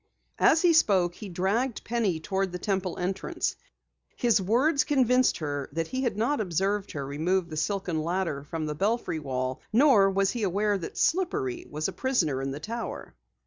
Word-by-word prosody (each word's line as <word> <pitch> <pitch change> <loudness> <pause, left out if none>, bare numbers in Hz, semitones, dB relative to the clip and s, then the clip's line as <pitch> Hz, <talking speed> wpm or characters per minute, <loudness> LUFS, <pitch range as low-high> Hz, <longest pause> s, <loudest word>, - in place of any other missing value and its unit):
As 320 - +4
he 345 -1 +5
spoke, 190 - +3
he 200 +3 -9
dragged 205 +8 -1
Penny 220 -8 0
toward 190 +3 -2
the 180 - -4
Temple 190 -2 -2
entrance. 185 +2 -2 0.6
His 235 -5 +2
words 265 - +2
convinced 255 -3 +3
her 145 -3 -4
that 165 +1 -2
he 260 - -2
had 235 -6 -1
not 240 +4 +1
observed 195 +2 -1
her 140 -3 -4
remove 170 +5 -1
the - - -4
silken 180 -1 -1
ladder 170 -4 -2
from 155 +2 -4
the 150 - -2
belfry 200 0 -1
wall, 130 -3 -3
nor 230 -5 +5
was 195 0 +1
he 240 - -4
aware 205 +1 +1
that 185 -4 -6
Slippery 370 0 0
was 155 +1 -2
a 190 - -5
prisoner 170 - 0
in 135 - -2
the 135 +2 -5
tower. 230 +7 -6
195 Hz, 180 wpm, -27 LUFS, 165-235 Hz, 0.6 s, he